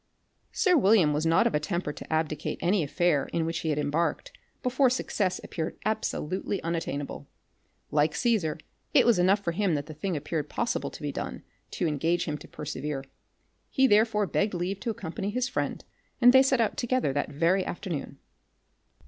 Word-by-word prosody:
Sir 365 -4 +3
William 195 - +5
was 155 +2 0
not 165 - +4
of - - +1
a 150 - +2
temper 160 -1 -2
to - - -10
abdicate 155 -1 -1
any 180 +3 +2
affair 150 -1 +1
in 165 -1 0
which 165 0 -2
he 160 - -2
had 150 - 0
embarked, 155 - -1 0.3
before 255 +1 +3
success 205 -6 -1
appeared 160 -2 -4
absolutely 200 -3 -2
unattainable. 145 - -3 0.6
Like 150 +1 +2
Caesar, 205 -11 +1 0.4
it - - +7
was 235 -6 +4
enough 190 +3 +4
for 170 - 0
him 185 -1 +1
that 145 -1 -2
the 155 - -9
thing 165 +3 -2
appeared 150 0 -3
possible 235 - -1
to - - -11
be - - -1
done, - - -5 0.3
to 180 - -1
engage 165 +3 0
him 150 -2 -3
to - - -12
persevere. 150 -2 -5 0.7
He 265 - +3
therefore 210 -2 +4
begged 200 +1 0
leave 180 +3 -2
to 235 - -3
accompany 195 -2 -4
his 250 +4 -1
friend, - - -3 0.3
and 245 +1 +7
they 265 - +8
set 265 -1 +2
out 225 - +1
together 245 - 0
that 145 - -1
very 170 +6 +2
afternoon. 170 -8 -5
175 Hz, 180 wpm, -28 LUFS, 150-215 Hz, 0.7 s, they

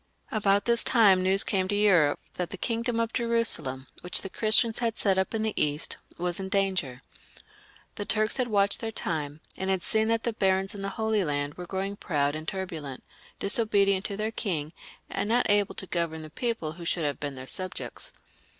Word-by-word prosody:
About 200 -2 +2
this 235 -1 +4
time 200 -6 +5
news 190 +1 +6
came 190 -2 0
to 205 - 0
Europe 180 -8 +4
that 180 -1 -3
the 195 - -6
kingdom 230 +2 -1
of 230 0 -1
Jerusalem, 230 - +1 0.2
which 180 - 0
the 195 - -6
Christians 220 +1 +3
had 230 -2 -1
set 195 -2 +2
up 190 +4 -1
in 220 - -1
the 220 -1 -1
East, 150 +1 0 0.2
was 175 +1 -2
in 190 0 -4
danger. 185 -10 -1 0.9
The 205 - -3
Turks 215 +3 +1
had 255 -2 0
watched 200 -2 +2
their 225 -1 -4
time, 155 -7 -2 0.2
and 190 0 -2
had 190 -2 0
seen 220 +4 +1
that 230 0 +1
the 235 - -1
barons 195 0 +1
in 200 - -7
the 195 - -2
Holy 220 -2 +1
Land 145 -2 -2
were 180 +2 -8
growing 195 +2 -3
proud 145 -6 0
and 155 +1 -6
turbulent, 165 -9 -5 0.3
disobedient 200 -2 +3
to 200 - -3
their 215 +1 -1
king, 165 -9 -2 0.3
and 205 - -3
not 245 +2 +3
able 205 -1 +2
to - - -3
govern 165 -3 -3
the 155 - -11
people 230 -7 -2
who 170 +2 -10
should 170 -1 -1
have 145 -1 -2
been 145 -2 -4
their 130 0 -8
sub 185 +7 -2
jects. - - -6
195 Hz, 205 wpm, -27 LUFS, 165-220 Hz, 0.9 s, news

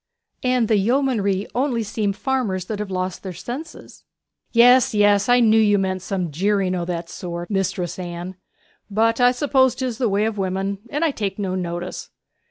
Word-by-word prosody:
'And 250 -3 +1
the 215 - +3
yeomanry 210 -3 +1
only 250 -3 0
seem 210 -1 -1
farmers 205 -5 -2
that 210 +1 -5
have 210 -2 -4
lost 185 -1 -3
their 190 -2 -6
senses.' 255 - -8 0.5
'Yes, 245 +1 +5
yes! 205 0 +3
I 245 0 +5
knew 220 -1 +5
you 205 -2 +4
meant 190 -1 -1
some 185 -4 -3
jeering 190 +3 +1
o' 175 -2 -2
that 170 -1 -4
sort, 175 +1 -6
Mistress 190 -2 -2
Anne. 175 +1 -6 0.5
But 225 +3 +1
I 245 0 +6
suppose 260 -1 +2
'tis 250 -3 -3
the 245 -4 +1
way 205 +2 +1
of 220 -2 -2
women, 195 +1 -2
and 295 +6 0
I 320 - +2
take 200 -6 -3
no 195 -3 -2
notice. 175 -1 -4
205 Hz, 180 wpm, -22 LUFS, 185-240 Hz, 0.5 s, I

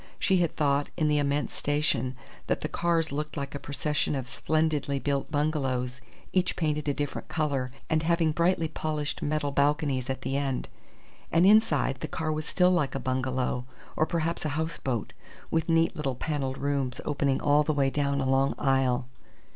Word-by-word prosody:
She 190 - +2
had 170 -3 +1
thought, 145 -1 +1
in 155 -3 +2
the 150 0 +3
immense 145 0 0
station, 140 -4 0 0.3
that - - 0
the - - -1
cars 165 -2 +1
looked 150 +2 -4
like 140 -1 -4
a 140 - -4
procession 145 +1 -1
of 130 -2 -3
splendidly 150 +1 0
built 140 0 -1
bungalows 130 -4 -1 0.3
each 185 -1 +2
painted 150 -2 -1
a - - +2
different 145 0 -3
colour 140 -5 -1 0.2
and 160 -1 +2
having 165 -1 +2
brightly 170 +1 +2
polished 150 -1 -3
metal 145 -1 0
balconies 140 -2 +1
at 130 0 -3
the 135 - -2
end. 135 -2 -2 0.6
And 170 +3 +5
inside, 190 -10 +4
the - - -4
car 160 -1 -2
was 155 +1 -3
still 180 -1 +4
like 160 -7 +1
a - - -1
bungalow, 130 -1 -1 0.3
or 155 - +2
perhaps 170 -1 -1
a 155 - -1
houseboat, 150 -8 -2 0.4
with 165 +1 0
neat 165 +1 +3
little 135 -4 -2
panelled 135 -1 -2
rooms 135 -2 -1
opening 140 -2 +1
all 145 +1 +4
the 150 - +1
way 140 -2 +2
down 140 -1 0
a 135 - 0
long 135 +1 +2
aisle. 135 -2 +2
145 Hz, 180 wpm, -28 LUFS, 135-155 Hz, 0.6 s, And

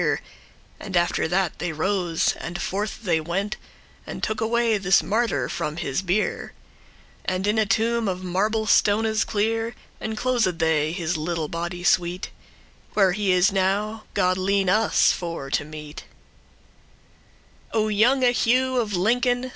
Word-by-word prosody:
*praising - - +1 0.6
And 195 -4 -3
after 175 -2 +1
that 180 +1 0
they 175 - -2
rose, 175 +1 0
and 175 +3 -5
forth 205 +5 -3
they 165 -5 +1
went, 195 +6 -2 0.5
And - - -7
took 215 +1 -1
away 230 -1 +1
this 190 0 +3
martyr 205 - 0
from 150 +4 -4
his 165 -3 -2
bier, 190 +3 -1 0.7
And 185 +1 -1
in 210 +2 +2
a 215 - +2
tomb 225 +3 +1
of 185 -1 -3
marble 210 +5 0
stones 220 +1 +3
clear 225 +2 -1 0.2
Enclosed 220 -4 0
they 155 -2 +1
his 170 -1 -2
little 160 -1 -3
body 175 +1 -4
sweet; 175 0 +1 0.6
Where 195 -3 +4
he 195 +1 0
is 180 +1 +4
now, 205 +3 -1
God 185 -1 +2
lene* 195 0 +1
us 215 +3 +4
for 165 -6 -5
to - - +1
meet. 150 0 -9 1.7
*grant 220 -1 +1
O - - -1
younge 245 +4 +3
Hugh 255 +2 +2
of 215 -5 0
Lincoln! 245 +6 +1
195 Hz, 145 wpm, -24 LUFS, 175-220 Hz, 1.7 s, Where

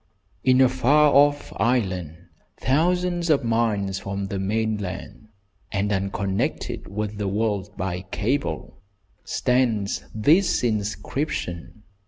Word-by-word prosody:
In 130 0 +5
a 130 - +7
far 145 +4 +4
off 145 +1 +3
island, 95 -9 0 0.4
thousands 175 +4 +1
of 140 -4 +3
miles 110 -4 0
from 100 0 -4
the 95 0 -4
mainland, 105 0 -3 0.4
and 105 +1 0
unconnected 100 0 -2
with 105 +1 -4
the 105 - -1
world 100 -1 -1
by 95 -2 -2
cable, 105 - -2 0.4
stands 120 -6 0
this 155 - +3
inscription. 105 - -3
105 Hz, 105 wpm, -24 LUFS, 100-130 Hz, 0.4 s, a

